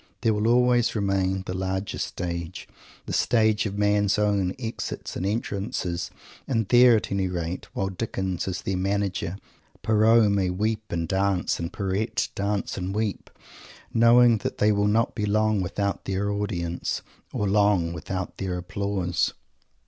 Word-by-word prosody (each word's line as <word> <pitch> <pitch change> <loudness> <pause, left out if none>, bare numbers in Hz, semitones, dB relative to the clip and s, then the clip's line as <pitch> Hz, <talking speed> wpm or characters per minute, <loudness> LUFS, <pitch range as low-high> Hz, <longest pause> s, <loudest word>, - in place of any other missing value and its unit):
There 115 -2 +3
will 105 +1 0
always 120 0 +3
remain 95 -2 0
the 90 - -4
larger 95 +1 -3
Stage, 85 0 -4 0.4
the - - -5
stage 110 -2 +2
of 100 0 -5
man's 105 -1 +2
own 100 -3 +1
Exits 115 -2 -5
and 95 - -2
Entrances; 100 -5 -2 0.4
and 115 -5 0
there, 120 -1 +7
at 110 - -2
any 100 -1 0
rate, 90 0 -4
while 95 - -1
Dickens 95 -3 -3
is 95 -1 -3
their 95 -1 -1
"Manager," 95 -1 -1 0.5
Pierrot 110 0 +4
may 95 -2 +1
weep 110 +4 -1
and 85 -1 -1
dance, 95 -1 0
and 85 +1 -3
Pierrette 100 +3 -1
dance 100 0 -2
and 95 +2 -3
weep, 110 -3 -2 0.6
knowing 115 0 +6
that - - -4
they 105 - +4
will 100 0 +2
not 110 +3 +2
be 105 -2 -2
long 110 0 +2
without 100 +2 -2
their 100 +1 -1
audience, 90 -5 -2 0.3
or 105 - -1
long 100 -4 +3
without 95 +2 -5
their 95 -2 -2
applause! 90 -1 -1
100 Hz, 150 wpm, -25 LUFS, 95-110 Hz, 0.6 s, there